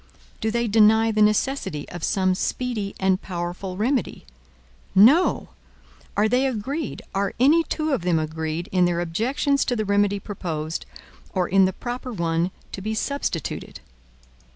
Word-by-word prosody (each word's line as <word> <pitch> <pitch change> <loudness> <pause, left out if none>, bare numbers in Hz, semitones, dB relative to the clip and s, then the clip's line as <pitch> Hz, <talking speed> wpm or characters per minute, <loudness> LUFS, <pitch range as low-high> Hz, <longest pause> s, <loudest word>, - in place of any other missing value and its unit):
Do 220 - 0
they 235 +1 0
deny 220 +1 +5
the 215 0 +1
necessity 210 - +1
of 175 -2 -8
some 185 -1 +2
speedy 215 +1 -2
and 190 0 +2
powerful 180 +1 -5
remedy? 245 - -1 0.7
No. 260 - +5 0.7
Are 210 +1 +4
they 250 +4 +2
agreed, 265 +4 -4
are 195 0 -1
any 295 +7 +5
two 310 -2 -2
of 265 - 0
them 175 -1 +1
agreed, 160 +1 -3
in 180 -1 +3
their 175 -1 0
objections 240 - 0
to 245 - 0
the 215 -2 -1
remedy 205 0 +2
proposed, 165 -6 -5 0.5
or 180 -2 +1
in 195 0 +5
the 185 - 0
proper 245 +4 -5
one 170 -3 0 0.2
to 195 - -6
be 215 +2 -3
substituted? 250 - -3
205 Hz, 150 wpm, -23 LUFS, 180-240 Hz, 0.7 s, deny